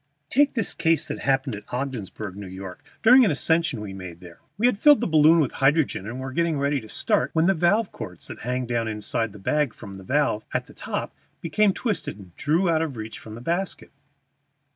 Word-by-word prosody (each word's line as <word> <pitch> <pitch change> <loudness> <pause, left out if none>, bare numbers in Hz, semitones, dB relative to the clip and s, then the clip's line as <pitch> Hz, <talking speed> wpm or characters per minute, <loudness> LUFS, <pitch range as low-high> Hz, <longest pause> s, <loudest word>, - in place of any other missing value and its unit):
Take 285 +1 +3
this 225 -5 0
case 165 -1 +1
that - - -5
happened 135 -3 0
at 105 0 -12
Ogdensburg, 115 -6 -4
New 100 -1 -8
York, 95 0 -9 0.2
during 250 +3 +8
an 215 - +4
ascension 160 -2 +1
we 100 -2 -6
made 90 -3 -8
there. 85 -2 -13 0.2
We 220 - +1
had 245 -5 +3
filled 295 +2 +7
the - - -1
balloon 160 0 +5
with 145 -6 +1
hydrogen, 135 - +1
and 120 +3 -5
were 130 0 -5
just 170 0 +1
ready 140 -1 0
to 110 - -13
start 125 - +1
when 160 0 +3
the 195 - +4
valve 190 +5 +2
cords 90 -4 -7
that - - -8
hang 125 +2 -2
down 120 -1 -1
inside 110 +1 -2
the 105 - -12
bag 145 +5 0
from 100 - -10
the 95 0 -10
valve 130 -2 +1
at - - 0
the - - -16
top - - -4 0.3
became 205 +4 +2
twisted 190 - -3
and 95 -4 -15
drew 165 +4 +1
up 170 - +3
out - - 0
of 150 -7 -3
reach 110 0 -7
from 110 -1 -10
the 115 - -9
basket. 175 +8 -3
135 Hz, 225 wpm, -24 LUFS, 110-165 Hz, 0.3 s, during